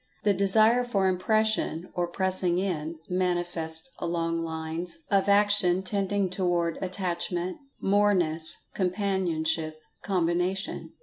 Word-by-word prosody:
The 205 - +4
Desire 215 +5 +4
for 200 -6 +1
Impression 185 -2 0
(or 175 -1 -1
pressing 185 0 0
in) 165 -4 -2
manifests 175 +1 -1
along 165 -1 -1
lines 165 +1 -4
of 195 0 +3
action 200 -3 +5
tending 200 0 0
toward 175 -2 -1
Attachment, 180 -1 -2 0.2
Moreness, 185 -6 +2 0.2
Companionship, 175 -5 -1 0.2
Combination. 180 +1 -1
180 Hz, 100 wpm, -27 LUFS, 170-195 Hz, 0.2 s, action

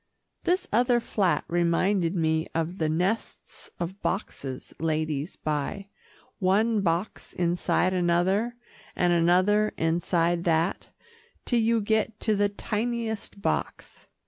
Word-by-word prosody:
This 365 +2 +1
other 240 +1 +4
flat 190 -8 0
reminded 175 +2 +1
me 160 -1 +1
of 165 +3 -2
the 160 -1 +1
nests 180 +8 -2
of 175 +3 -5
boxes 135 -9 -4
ladies 155 -1 -1
buy 155 +7 -3 0.5
one 205 +3 +2
box 175 +2 -2
inside 180 +1 +1
another, 185 +6 +1 0.4
and 175 -1 +2
another 185 +5 +3
inside 170 +1 +1
that, 165 +1 +1 0.6
till 240 - +2
you 225 0 +2
get 220 +1 0
to 215 - +2
the 205 0 +2
tiniest 220 -1 -3
box. - - -3
185 Hz, 115 wpm, -27 LUFS, 165-215 Hz, 0.6 s, other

